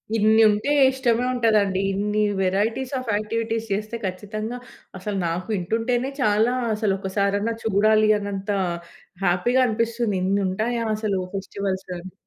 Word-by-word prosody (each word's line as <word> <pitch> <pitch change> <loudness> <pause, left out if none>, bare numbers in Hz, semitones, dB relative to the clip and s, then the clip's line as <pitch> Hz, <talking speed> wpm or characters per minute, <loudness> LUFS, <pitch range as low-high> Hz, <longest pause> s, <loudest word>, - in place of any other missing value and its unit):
ఇన్ని 220 +1 +4
ఉంటే 210 +7 0 0.2
ఇష్టమే 245 -2 +1
ఉంటదండి. 210 -5 +2
ఇన్ని 210 +2 0 0.2
వేరైటీస్ 210 +8 0
ఆఫ్ 245 -4 -3
యాక్టివిటీస్ 225 +1 -2
చేస్తే 215 +3 -3
ఖచ్చితంగా 215 +5 -4 0.4
అసలు 200 +1 -4
నాకు 170 +2 -3
వింటుంటేనే 230 +7 0
చాలా 215 +2 +3 0.2
అసలు 210 -2 0
ఒకసారన్నా 200 +3 0
చూడాలి 215 +1 +3
అన్నంతా 200 0 -3 0.7
హ్యాపీగా 195 +9 +2
అనిపిస్తుంది. 230 -1 -1
ఇన్ని 200 +2 +1
ఉంటాయా 230 +5 -1
అసలూ 210 -3 -1 0.2
ఫెస్టివల్స్‌లో 195 -1 -4
అని. 185 +1 -11
210 Hz, 120 wpm, -23 LUFS, 195-230 Hz, 0.7 s, ఇన్ని